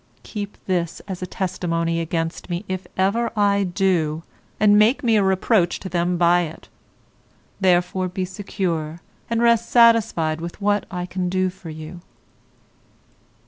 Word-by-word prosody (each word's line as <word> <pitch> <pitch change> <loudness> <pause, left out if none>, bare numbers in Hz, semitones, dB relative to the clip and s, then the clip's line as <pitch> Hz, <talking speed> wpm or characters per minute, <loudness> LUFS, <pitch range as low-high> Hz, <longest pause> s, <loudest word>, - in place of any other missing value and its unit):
Keep 205 -2 -6
this 175 -3 -1
as 185 -2 -6
a 180 - -3
testimony 170 -3 -2
against 165 +1 -3
me 175 +4 -3
if 185 0 -4
ever 200 +5 +1
I 200 -1 +3
do, 175 -4 0 0.4
and 205 0 +5
make 225 +7 +3
me 230 -2 +3
a 210 - +4
reproach 190 -1 +2
to 190 - -7
them 175 0 0
by 175 +1 +4
it; 160 -2 -7 0.9
therefore 185 0 +2
be 185 +1 -3
secure, 180 -5 -3 0.3
and 230 0 +1
rest 235 -1 +3
satisfied 225 -10 +4
with 170 +3 -7
what 205 0 +1
I 180 -1 -4
can 180 0 -3
do 185 0 0
for 180 -2 -11
you. 155 +3 -9
185 Hz, 145 wpm, -22 LUFS, 170-205 Hz, 0.9 s, and